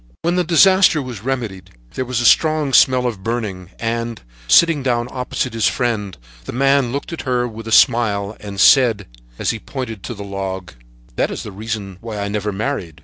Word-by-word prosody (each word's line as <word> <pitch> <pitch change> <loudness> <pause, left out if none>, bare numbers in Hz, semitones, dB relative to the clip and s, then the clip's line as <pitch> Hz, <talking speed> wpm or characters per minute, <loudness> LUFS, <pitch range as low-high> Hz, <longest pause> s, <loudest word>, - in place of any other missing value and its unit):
When 170 +1 +1
the 180 - +2
disaster 185 0 +5
was 125 -7 -6
remedied, 115 -8 -4 0.2
there 130 - -3
was 125 -2 -2
a - - -1
strong 155 0 +3
smell 130 -1 +5
of 115 -6 -3
burning, 105 -5 -4
and, 115 -1 -3 0.3
sitting 165 - +5
down 120 -2 0
opposite 125 0 -3
to 115 - -7
his 110 - +3
friend, 110 -6 -2 0.3
the - - -5
man 135 -1 +2
looked 140 +5 -4
at 165 - -5
her 125 -1 0
with 115 -1 -9
a - - -5
smile 105 -3 +3
and 100 -2 -8
said, 115 -7 +5 0.3
as - - 0
he 115 - -5
pointed 115 -5 -6
to 120 - -5
the 100 - -7
log: 95 -4 -5 0.4
"That - - +1
is - - -5
the 105 - -8
reason 100 -2 -6
why 115 -2 -6
I 100 0 -3
never 105 0 -2
married." 95 - -4
115 Hz, 200 wpm, -19 LUFS, 100-130 Hz, 0.4 s, disaster